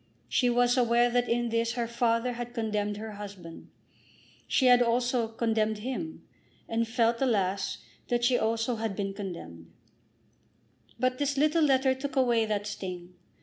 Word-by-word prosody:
She 245 - +2
was 245 +1 +3
aware 240 0 +3
that 245 0 +1
in 240 0 +1
this 230 0 0
her 235 -1 -2
father 235 +1 0
had 240 0 -6
condemned 210 -2 -1
her 220 +1 -6
husband. 200 -5 -10 0.8
She 260 - +3
also 245 0 +3
had 225 0 -19
condemned 220 -2 +1
him; 260 +8 -5 0.4
and 230 0 0
felt, 230 0 +1
alas, 200 -6 0 0.3
that 240 0 0
she 245 +1 +4
also 225 +1 0
had 220 -2 -3
been 195 -1 -3
condemned. 125 - -8 1.3
But 255 0 0
this 285 -1 0
little 310 +3 +3
letter 265 -2 +3
took 270 +1 -5
away 240 -4 +3
that 205 -1 -1
sting. 180 -3 -6
230 Hz, 150 wpm, -28 LUFS, 210-245 Hz, 1.3 s, she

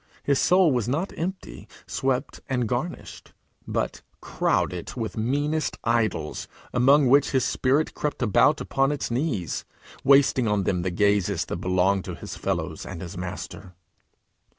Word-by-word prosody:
His 140 -2 +2
soul 180 -2 +4
was 120 -4 0
not 160 +9 -1
empty, 185 +3 -5 0.2
swept, 130 -1 -2
and 125 -3 0
garnished, 125 +10 -5 0.3
but - - -2 0.2
crowded 90 -2 -1
with 115 -4 -4
meanest 145 +7 -1
idols, 115 -9 0 0.3
among 135 +4 +5
which 140 +3 +5
his 130 -2 +1
spirit 140 +4 +1
crept 150 -3 -2
about 125 +7 +4
upon 135 +1 +1
its 145 -4 -3
knees, 120 - -1 0.4
wasting 135 -3 +5
on 105 -2 +1
them 90 -2 0
the 95 - -1
gazes 100 -1 +1
that - - -4
belonged 95 +2 +1
to - - -5
his - - -8
fellows - - -3
and - - -7
his 85 0 -7
Master. 90 +1 -7
125 Hz, 145 wpm, -25 LUFS, 100-140 Hz, 0.4 s, among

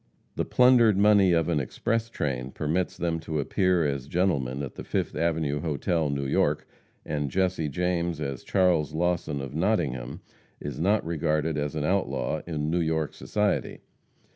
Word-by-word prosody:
The - - -1
plundered 125 -5 +5
money 100 -2 +5
of 80 -2 +2
an 80 -3 +1
express 115 - -2
train 65 - -3
permits 85 +5 -1
them 85 -1 -1
to 80 -1 -3
appear 90 +3 +2
as 70 -2 -2
gentlemen 70 -7 0
at 70 - -6
the - - -8
Fifth - - -2
Avenue 80 -2 0
hotel, 80 +1 0
New 70 -1 -2
York, 65 - +1 0.4
and 75 -2 -2
Jesse 90 -2 0
James 85 +1 -1
as 70 -4 -4
Charles 90 -5 +2
Lawson, 85 -4 0
of 70 0 -7
Nottingham, 75 - -1 0.4
is 75 - -6
not 100 +4 +2
regarded 80 -1 0
as 75 0 -2
an 75 - -1
outlaw 75 -5 0
in 75 -2 -2
New 85 +1 +1
York 80 -2 -1
society. 105 -1 -1
80 Hz, 160 wpm, -27 LUFS, 75-90 Hz, 0.4 s, plundered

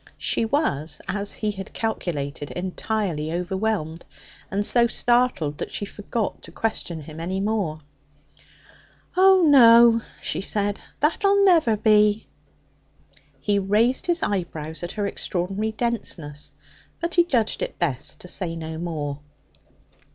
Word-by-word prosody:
She - - 0
was, 160 - 0
as 205 0 -1
he 215 -1 -2
had 195 -2 -8
calculated, 150 -10 -3
entirely 180 -3 -3
overwhelmed, 180 -2 -2 0.5
and 205 +1 -1
so 235 +1 +4
startled 240 -12 +1
that - - -4
she 205 - -3
forgot 205 +1 -4
to - - -10
question 180 -7 -3
him 155 +2 -10
any 185 +3 -2
more. 195 -7 -1 1.3
'Oh, 380 0 +6
no,' 235 -5 +7 0.2
she - - -3
said; 205 0 -1 0.2
'that'll 395 +6 +3
never 320 - +4
be.' 210 0 +3 1.1
He 205 -1 +1
raised 215 - +2
his 345 0 +1
eyebrows 160 -5 -3
at 175 +1 -5
her 205 -1 -2
extraordinary 195 +2 -2
denseness, 185 -11 -4 0.5
but 340 +1 -3
he 345 - +5
judged 240 -10 0
it - - -4
best 145 -7 -2
to - - -9
say 175 -2 -3
no 160 -1 -6
more. 150 -4 -4
205 Hz, 130 wpm, -24 LUFS, 165-230 Hz, 1.3 s, no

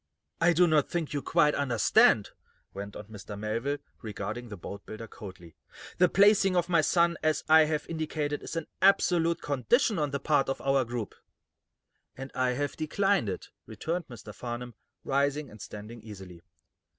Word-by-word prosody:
"I 175 +1 +4
do 180 +2 +5
not 155 -4 +2
think 165 -4 -3
you 145 - -1
quite 150 +2 +3
understand," 125 -5 +3 0.4
went 100 +1 -7
on - - -7
Mr. 105 -1 -9
Melville, 115 +7 -2 0.2
regarding 110 +2 -5
the 105 - -7
boatbuilder 105 +5 -8
coldly. 90 -7 -11 0.4
"The 180 0 +5
placing 200 0 +4
of 175 -1 +2
my 170 -3 +3
son 170 +2 +2
as 155 0 +1
I 160 0 +7
have 150 -1 -2
indicated 155 -2 -3
is - - -7
an 165 -2 -2 0.2
absolute 175 -3 +3
condition 170 - +1
on 150 -1 0
the 140 0 -3
part 140 -2 +1
of 135 - -2
our 135 -1 +1
group." 120 -2 -5 1.0
"And 135 +1 -7
I 130 -1 +1
have 145 +3 -2
declined 195 - +1
it," 95 - -6 0.2
returned 165 - -4
Mr. 120 -3 -10
Farnum 120 0 -6 0.3
rising, 140 +1 0
and 105 -1 -13
standing 105 +3 -9
easily. 95 -5 -11
140 Hz, 165 wpm, -29 LUFS, 110-160 Hz, 1.0 s, I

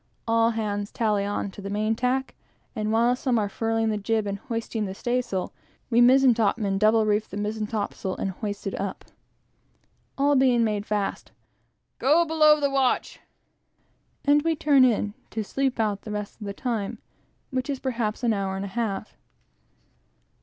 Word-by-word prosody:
All 230 0 +3
hands 210 -3 -2
tally 210 -3 0
on 205 -1 -2
to 200 - -10
the 200 - -6
main 215 +2 0
tack, 255 +3 -1 0.4
and 215 -1 -1
while 235 +2 +3
some 255 -1 0
are 210 -2 +1
furling 225 +2 -1
the 210 -1 -1
jib, 220 +1 0
and 200 0 -3
hoisting 225 -2 -3
the 190 -1 -5
staysail, 240 -5 -2 0.4
we 235 +1 +5
mizen 260 +1 +6
topmen 210 -3 0
double 215 +1 +4
reef 210 0 +1
the 200 - -6
mizen 210 +1 -2
topsail 205 -3 -3
and 195 - -2
hoist 205 +1 -5
it 195 - -3
up. 200 -1 -5 1.1
All 285 +1 +3
being 255 -3 +4
made 210 -2 -1
fast 205 -2 -2 0.7
"Go 315 +6 +4
below, 305 -1 +5
the 280 -1 +1
watch!" 270 -2 0 1.1
and 290 +1 +5
we 325 +1 +1
turn 285 -3 +4
in 215 -4 +2 0.2
to 220 - -3
sleep 265 +3 -1
out 210 -3 0
the - - -9
rest 210 +1 -5
of 205 - -5
the 200 - -4
time, 230 -6 -3 0.5
which 260 +1 -2
is 280 - -1
perhaps 235 -4 -2
an 235 -2 +3
hour 195 -2 -2
and 195 +1 -3
a - - -6
half. 215 -1 -3
225 Hz, 175 wpm, -25 LUFS, 205-250 Hz, 1.1 s, mizen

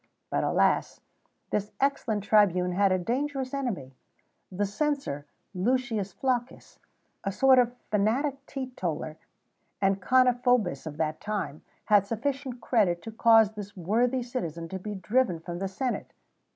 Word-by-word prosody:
But, - - +1
alas! - - +2 0.5
this 205 0 -1
excellent 240 -7 0
tribune 185 -4 +3
had 195 +2 +3
a 185 - +3
dangerous 265 +6 -2
enemy: 210 - -3 0.6
the 200 +3 0
censor, 205 - -2 0.3
Lucius 220 0 0
Flaccus, 250 +3 -3 0.4
a 195 - -1
sort 265 +5 +5
of 245 0 +2 0.2
fanatic 260 +7 +1
teetotaller 185 - -4 0.6
and 195 0 +1
carniphobis 245 - +3
of 150 -1 -7
that 155 -1 -2
time, 200 -8 -3 0.2
had 205 -2 +4
sufficient 260 +2 -3
credit 185 -8 +1
to 225 - -6
cause 225 -1 +5
this 205 -2 -9
worthy 235 +8 +1
citizen 170 - -4
to 190 - -5
be 210 +2 -5
driven 210 -2 +1
from 175 +1 -6
the 195 - -1
senate. 245 +6 -3
215 Hz, 135 wpm, -28 LUFS, 185-255 Hz, 0.6 s, sort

